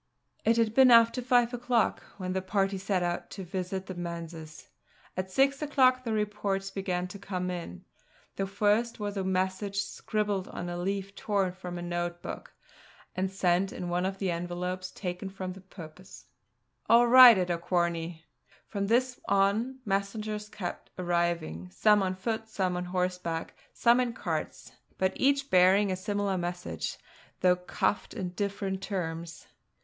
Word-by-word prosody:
It 230 +1 +3
had 225 -2 +2
been 265 +1 +7
after 230 +1 +6
five 245 -1 +3
o'clock 245 -1 +1 0.2
when 185 -2 -3
the 190 - -1
party 195 0 0
set 190 -2 0
out 175 0 -2
to 195 - -7
visit 185 +1 -4
the 190 - -6
manses; 170 -2 -7 0.5
at 185 +1 -3
six 275 +7 +2
o'clock 260 -4 +3
the 230 - -3
reports 205 -2 -1
began 185 -2 -2
to 200 - -9
come 185 -2 -3
in. 170 - -7 0.5
The 195 - -2
first 210 +4 +1
was 205 -1 -3
a 195 - -1
message 190 +2 -1
scribbled 205 -4 -2
on 175 - -6
a 175 - -4
leaf 195 +1 -2
torn 200 -3 0
from 180 -1 -7
a 175 - -5
note 175 0 -3
book, - - -7 0.6
and 185 +1 0
sent 190 0 +1
in 180 - -5
one 180 +1 0
of 195 0 -4
the 190 -2 -1
envelopes 180 +2 -3
taken 180 0 -5
for 190 -1 -7
the 185 +1 -8
purpose. 185 -1 -12 0.6
"All 235 +1 +7
right 245 -2 +10
at 180 -1 0
Auquharney." 170 -1 -1 0.4
From 200 -2 -2
this 250 +3 +1
on, 210 +7 +2
messengers 210 +1 -2
kept 185 -4 -6
arriving, 170 - -1
some 210 - +4
on 185 -1 -1
foot, 220 +3 -3
some 185 -4 -1
on 180 0 -3
horseback, 180 -2 -2 0.2
some 235 +1 +4
in 245 -2 0
carts: - - -4 0.3
but 190 0 +1
each 275 +1 +1
bearing 190 +2 +5
a - - 0
similar 200 0 -1
message, 175 0 -4 0.4
though 180 0 +5
couched 180 +3 -2
in 180 - -3
different 195 0 -3
terms. 170 -4 -4
190 Hz, 160 wpm, -29 LUFS, 180-210 Hz, 0.6 s, right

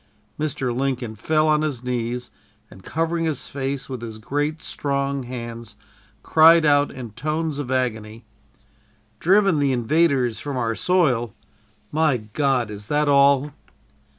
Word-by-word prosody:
Mr. 140 -5 -2
Lincoln 130 -3 -2
fell 155 +8 +1
on 155 0 +3
his 140 -6 -3
knees 125 0 -3 0.4
and, 95 0 -14
covering 165 - -1
his 155 -5 -3
face 135 0 -3
with 130 -3 -6
his 110 -2 -7
great, 145 +7 -3
strong 140 -1 -2
hands, 115 -3 -7 0.5
cried 165 +1 +6
out 145 -1 +4
in 120 -4 -8
tones 155 +5 -3
of 140 -4 -4
agony: 115 -3 -2 0.9
"'Driven 195 -2 +3
the 140 -1 +2
invaders 130 -1 +1
from 145 -3 -4
our 115 -2 0
soil!' 125 - +1 0.6
My 155 -3 +2
God, 120 +1 -1
is 105 0 -9
that 150 +2 +1
all?" 140 0 +4
135 Hz, 135 wpm, -22 LUFS, 120-150 Hz, 0.9 s, cried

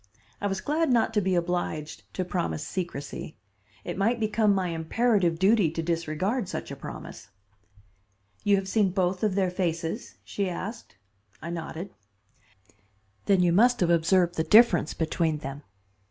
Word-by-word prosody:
I 205 - 0
was 195 -1 -2
glad 315 +2 0
not 235 -2 +2
to 210 - +2
be 190 -1 +1
obliged 170 -3 -3
to 185 - -1
promise 80 - -2
secrecy. 165 -2 -5 0.5
It - - -5
might 230 +4 +2
become 215 -1 +2
my 190 -2 +1
imperative 170 +2 +1
duty 195 -1 +4
to 165 - -2
disregard 170 +7 -1
such - - -5
a - - -5
promise. 95 - -9 1.1
"You 205 - +4
have 195 -1 -2
seen 205 -1 +2
both 185 -1 0
of 210 -3 +1
their 190 -2 +1
faces?" 170 +2 -3
she 200 -2 -2
asked. 200 - -6 0.4
I 170 - -6
nodded. 170 +2 -6 1.3
"Then 195 -3 +4
you 175 -1 +3
must 245 +6 +4
have 175 -2 +2
observed 175 +1 +3
the 160 - +2
difference 210 -6 +5
between 160 -1 0
them. 140 0 -7
180 Hz, 155 wpm, -27 LUFS, 165-205 Hz, 1.3 s, difference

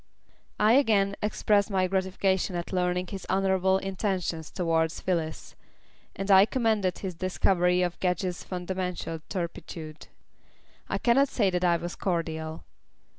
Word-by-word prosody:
I 215 +2 +5
again 210 -7 +3
expressed 210 -1 +2
my 190 -2 +2
gratification 190 0 0
at 175 +2 -4
learning 180 0 0
his 190 +1 -8
honourable 190 -1 +2
intentions 190 -4 -2
towards 165 -2 0
Phyllis, 165 -4 -3 0.6
and 195 +1 -2
I 195 +1 +8
commended 220 -8 +1
his 190 -2 -5
discovery 180 0 +1
of 175 -1 -3
Gedge's 180 0 -1
fundamental 180 -3 -4
turpitude. 165 -3 -6 0.8
I - - 0
cannot 265 +3 +3
say 205 -8 +1
that 180 0 -1
I 175 -1 +4
was 175 +1 -6
cordial. 160 -3 -3
185 Hz, 125 wpm, -27 LUFS, 175-195 Hz, 0.8 s, I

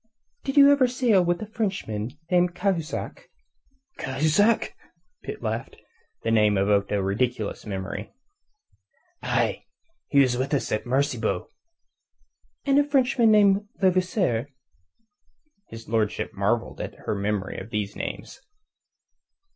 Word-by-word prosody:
"Did 270 0 -3
you 280 0 +9
ever 280 -3 +4
sail 245 -6 +3
with 175 +3 0
a - - -4
Frenchman 155 - -3
named 180 0 +3
Cahusac?" 180 -4 -3 0.7
"Cahusac?" 155 +12 +2 0.5
Pitt - - -7
laughed. 110 0 -3 0.5
The 115 - 0
name 105 -2 +4
evoked 100 +1 +2
a 100 -2 +1
ridiculous 110 +2 -2
memory. 95 -1 -5 1.1
"Aye. - - -1 0.4
He 140 - +3
was 125 -3 +3
with 135 +3 0
us 125 -5 -2
at 110 - -2
Maracaybo." 125 -7 -1 1.1
"And 280 0 +4
another 290 0 +1
Frenchman 250 -4 +3
named 205 -1 +4
Levasseur?" 180 - +1 1.2
His 115 0 -11
lordship 110 -2 -1
marvelled 105 +4 -1
at - - -6
her - - 0
memory 100 -1 -2
of 95 - -9
these 105 -3 -3
names. - - -6
135 Hz, 120 wpm, -25 LUFS, -, 1.2 s, you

